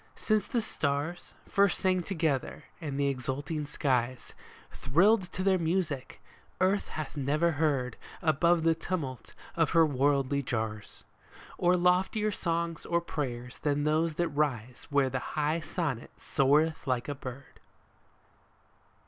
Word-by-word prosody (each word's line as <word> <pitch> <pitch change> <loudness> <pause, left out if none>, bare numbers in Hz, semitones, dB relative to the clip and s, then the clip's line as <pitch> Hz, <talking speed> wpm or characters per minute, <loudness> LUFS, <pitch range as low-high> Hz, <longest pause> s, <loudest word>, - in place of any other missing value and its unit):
Since 215 -2 +1
the 235 -3 0
stars 145 +1 -2
First 200 -2 +3
sang 185 -1 +2
together, 160 -7 -1 0.2
and 145 -3 -4
the 140 - +2
exulting 140 +3 -3
skies 130 -4 -1 0.4
Thrilled 180 - +3
to 185 - -3
their 190 -1 +3
music, 160 -5 -1 0.4
earth 195 +2 +2
hath 155 -1 -6
never 150 +4 +1
heard, 145 -6 0 0.2
Above 170 +1 +3
the 165 0 +4
tumult 160 -6 -5 0.2
of 165 -3 +2
her 165 - +7
worldly 140 -1 +1
jars, 110 -4 -4 0.6
Or 180 +1 +4
loftier 185 +4 +2
songs 170 -3 -2
or 170 - +1
prayers 125 -7 -5
than 145 -1 0
those 155 +1 +1
that 175 +1 0
rise 130 -5 -2
Where 140 -2 +2
the 130 - -1 0.2
high 155 +2 +1
sonnet 155 -7 -3
soareth 150 +3 +2
like 125 -2 0
a 145 - -2
bird 135 0 -9
150 Hz, 130 wpm, -30 LUFS, 135-170 Hz, 0.6 s, her